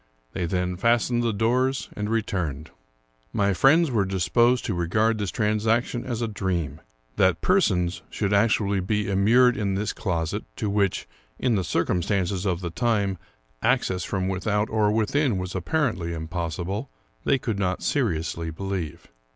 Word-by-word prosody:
They 90 - -2
then 90 0 -1
fastened 120 +3 +2
the 120 -1 +1
doors 125 +5 +1
and 105 0 -3
returned. 90 -9 -2 0.6
My 100 -1 +1
friends 145 - +4
were 110 -4 +2
disposed 115 +6 +2
to 105 - -1
regard 110 +6 +1
this 100 -3 -1
transaction 110 +3 0
as 120 -2 -2
a - - 0
dream. 95 -6 -3 0.4
That 95 -3 +3
persons 90 - +2
should 100 -2 -2
be - - +4
actually 100 -1 +1
immured 115 +6 +4
in 100 -3 -1
this 105 +1 -1
closet, 85 +1 -2
to 105 -4 -2
which, 100 -7 0 0.3
in 125 - +1
the 95 -3 +1
circumstances 90 +3 0
of 90 -1 -1
the 85 -2 -4
time, 100 -3 0 0.4
access 90 -1 +1
from 95 0 -2
without 105 +3 -1
or 110 -1 +2
within 115 +2 +1
was 90 0 -4
apparently 95 - -1
impossible, 85 - -4 0.3
they 135 - +3
could 115 -5 -3
not 95 -2 -1
seriously 85 - -1
believe. 95 -1 -4
100 Hz, 150 wpm, -25 LUFS, 90-115 Hz, 0.6 s, friends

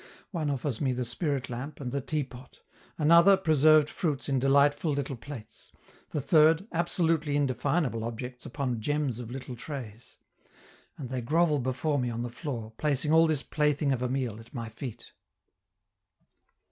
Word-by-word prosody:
One 160 -6 -2
offers 135 -3 -2
me 130 -3 +1
the 125 0 -2
spirit 135 +3 -2
lamp 130 +5 -6
and 125 -3 -4
the 140 +1 -2
teapot; 130 -3 -5 0.4
another, 170 +5 +6
preserved 155 -3 +5
fruits 150 -4 -2
in 135 -2 +1
delightful 140 +4 +3
little 140 -1 -2
plates; 115 -3 -11 0.4
the 150 - -2
third, 155 +5 +4
absolutely 165 -3 +1
indefinable 135 -2 0
objects 125 +2 -6
upon 125 -4 -3
gems 145 -1 -1
of 120 -2 -7
little 130 0 -6
trays. 120 -3 -8 0.8
And 130 -5 -6
they 130 -1 -3
grovel 155 +4 +2
before 130 +4 -1
me 125 -1 -1
on 120 0 -3
the 120 - -5
floor, 120 -6 -6
placing 150 0 +1
all 165 0 +6
this 155 -3 0
plaything 150 -1 +1
of 130 -2 0
a 125 - -1
meal 125 -5 -2
at 115 +4 -15
my 115 -2 -4
feet. 115 +1 -8
140 Hz, 160 wpm, -28 LUFS, 125-150 Hz, 0.8 s, another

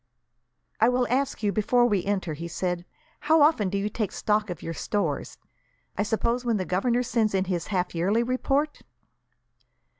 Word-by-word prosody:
"I 225 +2 +5
will 250 0 +2
ask 265 -3 0
you, 205 - +2
before 240 +4 +3
we 205 -6 +1
enter," 190 -5 -1
he 165 +3 -6
said, 175 0 -3 0.3
"how 315 0 +4
often 290 - +3
do 200 - -1
you 200 +1 -1
take 210 -1 -2
stock 210 -1 0
of 175 -3 -6
your 165 - -4
stores? 205 +5 -2 0.6
I - - 0
suppose 235 +3 0
when 235 -3 +1
the 185 - -2
governor 235 +8 +1
sends 225 -4 0
in 190 0 +1
his 180 -3 -2
half 185 -3 -1
yearly 195 +7 +1
report?" 270 +4 0
210 Hz, 175 wpm, -26 LUFS, 185-245 Hz, 0.6 s, I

